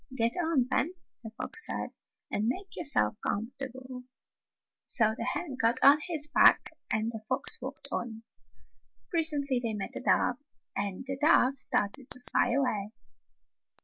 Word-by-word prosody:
"Get 230 -1 +1
on, 320 -7 +1
then," 335 +7 +1 0.3
the 225 - -8
fox 450 - -3
said, - - -4 0.4
"and 210 +2 0
make 375 +11 -3
yourself 275 - +1
comfortable." 255 +2 -5 0.8
So 220 -3 +3
the - - -4
hen 265 +2 -3
got 230 +2 +3
on 285 +2 +8
his 315 -4 +2
back - - +5 0.2
and 220 +1 0
the 220 -2 -7
fox - - -1
walked - - -8
on. 225 -1 -4 0.9
Presently 295 -6 +3
they 230 -3 -2
met 200 -2 -5
a - - -4
dove, 250 -1 +2 0.4
and 200 +4 -3
the 270 0 -4
dove 275 -4 +5
started 210 +6 -1
to - - -1
fly 245 0 +1
away. 220 -6 -1
255 Hz, 145 wpm, -29 LUFS, 225-280 Hz, 0.9 s, on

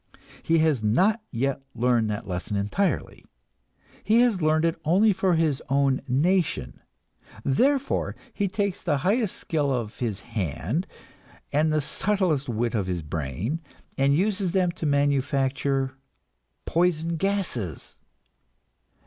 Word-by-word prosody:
He 165 - +2
has 155 -6 +2
not 190 - +3
yet 135 +3 -1
learned 120 -2 +2
that 105 -2 -4
lesson 95 +2 -3
entirely; 105 - -1 0.8
he 225 +2 +4
has 230 -7 +2
learned 155 +1 +3
it 165 0 -1
only 195 +7 +4
for 185 -1 +2
his 160 -4 +1
own 135 -1 +2
nation. 145 - +1 0.7
Therefore 270 - +1 0.2
he 205 - 0
takes 200 0 -2
the 150 -5 +1
highest 210 +1 +1
skill 150 -4 -1
of 120 -4 -3
his 110 -5 -2
hand 105 - -3 0.7
and 155 +2 +3
the 155 0 +2
subtlest 170 -4 0
wit 115 0 -1
of 100 -5 -1
his 90 -3 -2
brain, 80 - -3 0.3
and 140 +1 +3
uses 195 -1 +1
them 185 -2 +2
to 170 -3 -4
manufacture 140 -1 +1 0.7
poison 170 -1 +1
gases. 170 - -3
150 Hz, 125 wpm, -25 LUFS, 120-185 Hz, 0.8 s, he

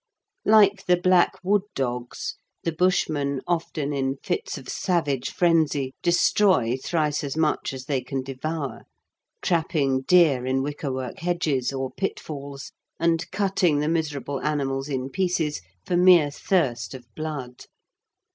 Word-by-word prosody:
Like 205 -2 +5
the 180 0 +5
black 180 0 +3
wood 200 +2 +3
dogs, 125 -2 -3 0.3
the 165 - 0
Bushmen 155 -5 +1
often 160 -4 -2
in 135 -1 -1
fits 430 - -2
of - - -11
savage 145 -8 -1
frenzy 155 -6 +2
destroy 175 - +3
thrice 150 +2 -1
as 140 +1 -4
much 155 -1 +1
as 130 -1 -7
they 135 -2 -1
can 135 0 -4
devour, 140 +2 -5 0.6
trapping 155 -6 +1
deer 150 -4 +4
in 130 +1 0
wickerwork 135 -3 -4
hedges, 160 -7 0
or 135 -1 -3
pitfalls, 140 -5 -5 0.3
and 165 0 +1
cutting 190 -6 +1
the 150 +1 0
miserable 150 -4 -2
animals 135 -2 -1
in 135 -1 -3
pieces, 175 - 0 0.2
for 180 - 0
mere 175 -5 +6
thirst 130 - 0
of 125 -2 -10
blood. 145 -6 -6
150 Hz, 130 wpm, -25 LUFS, 135-175 Hz, 0.6 s, mere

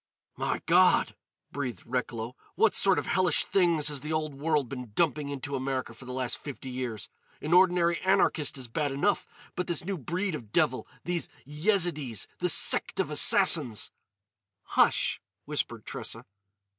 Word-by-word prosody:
"My - - -2
God!" - - +4 0.4
breathed 130 -8 -5
Recklow. 120 -1 -4 0.2
"What 225 - +3
sort 195 -2 +3
of - - -1
hellish 180 -4 +2
things 170 -6 +2
has 145 -3 -3
the 150 - -5
Old 155 -2 -1
World 145 -1 0
been 125 -3 -8
dumping 150 -3 +1
into 140 0 -5
America 130 -2 -3
for 120 +3 -14
the 125 - -7
last 125 -1 -2
fifty 135 -2 -8
years? 125 -5 -5 0.3
An 155 +3 -2
ordinary 175 -2 +4
anarchist 185 -7 +2
is 130 -2 -5
bad 145 +4 -2
enough, 170 +9 0 0.3
but 180 - -3
this 170 -1 -3
new 190 -2 -3
breed 180 +5 -2
of 115 -9 -7
devil—these 175 +8 -1 0.2
Yezidees—this 150 - 0
sect - - +3
of - - 0
Assassins——" 110 -4 +4 0.7
"Hush!" - - +2 0.2
whispered - - -3
Tressa. - - -6
145 Hz, 145 wpm, -28 LUFS, 130-175 Hz, 0.7 s, God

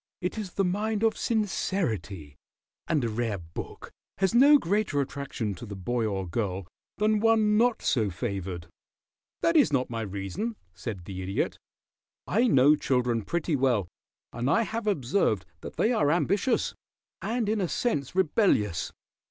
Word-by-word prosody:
It 180 - -2
is 195 -4 -6
the 195 - +1
mind 210 +4 -1
of 225 - +3
sincerity, 115 - -2 0.5
and 155 -5 +1
a - - +1
rare 110 -2 -1
book 85 -2 -8 0.3
has 190 +1 +1
no 280 +5 +8
greater 205 - 0
attraction 135 -6 -3
to 95 - -9
the 100 - -6
boy 110 +5 -1
or 95 -3 -2
girl 95 0 -2 0.3
than 215 0 +2
one 220 -1 +4
not 235 +2 +2
so 110 -6 +2
favored." 95 -3 -4 0.8
"That 335 0 +3
is 290 - +5
not 130 -3 0
my 115 -1 -2
reason," 100 - -4 0.2
said 90 +1 -6
the 95 0 -6
Idiot. 95 +1 -2 0.7
"I 230 +6 +2
know 145 - +6
children 125 -5 0
pretty 165 - -1
well, 125 -8 +2 0.5
and 120 +3 -1
I 230 +10 +4
have 225 0 -4
observed 130 - +1
that - - -9
they 225 - +2
are 145 -10 +2
ambitious, 190 - +1 0.5
and 230 0 -1
in 215 0 +1
a 180 - +1
sense 165 - -1
rebellious. 150 - +2
140 Hz, 155 wpm, -27 LUFS, -, 0.8 s, no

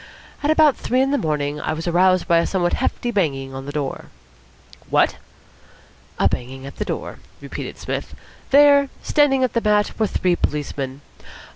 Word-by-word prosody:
At 295 - 0
about 310 -3 +4
three 255 - 0
o'clock - - +5
in 270 - 0
the 285 - +1
morning 150 -1 -1
I 155 - -2
was 165 +2 -5
aroused 185 +1 +3
by 170 -2 +4
a 170 - 0
somewhat 175 -2 0
hefty 245 -1 -1
banging 135 - -1
on 135 +1 -7
the - - -4
door." 145 -2 -4 0.8
"What!" - - +2 1.0
"A - - +3
banging 130 +2 -4
at 140 - -10
the - - -2
door," - - -5 0.2
repeated - - -7
Psmith. - - -5 0.3
"There, 285 0 +6
standing 270 -3 +3
on 255 - +1
the 235 - +1
mat, 210 -1 +1
were 220 - +2
three 180 -2 +1
policemen. 140 -3 -3
180 Hz, 175 wpm, -21 LUFS, -, 1.0 s, There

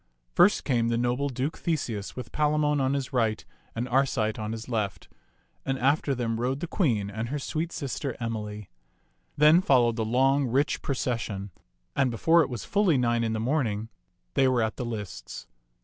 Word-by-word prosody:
First 205 - +5
came 120 -4 +1
the 115 0 +1
noble 125 +4 0
Duke 130 +4 -3
Theseus 120 - -2
with 125 - -7
Palamon 150 -1 +2
on 135 +1 +1
his 135 -1 -3
right 110 -3 0 0.3
and 120 +2 -2
Arcite 125 -5 +1
on 105 0 -3
his 115 0 -6
left, 110 -5 -2 0.6
and 135 0 -1
after 140 +2 +2
them 115 -2 -2
rode 130 +3 -1
the - - -3
queen 115 - 0
and 110 +2 -4
her 145 - -2
sweet 160 +4 -3
sister 140 -3 -4
Emily. 105 -3 -5 0.7
Then 155 +4 +6
followed 120 -8 +3
the 115 - 0
long, 135 +4 +2
rich 135 +5 +1
pro 140 - -2
cession; 110 -6 -3 0.4
and 135 -2 +2
before 165 +8 +4
it - - 0
was 120 -4 -5
fully 200 -7 +3
nine 120 -1 +1
in 110 -1 0
the 110 - -1
morning, 115 -4 -1 0.4
they 135 - +4
were 125 -3 +2
at 110 0 -2
the 125 - -3
lists. 105 - -6
125 Hz, 180 wpm, -27 LUFS, 115-140 Hz, 0.7 s, Then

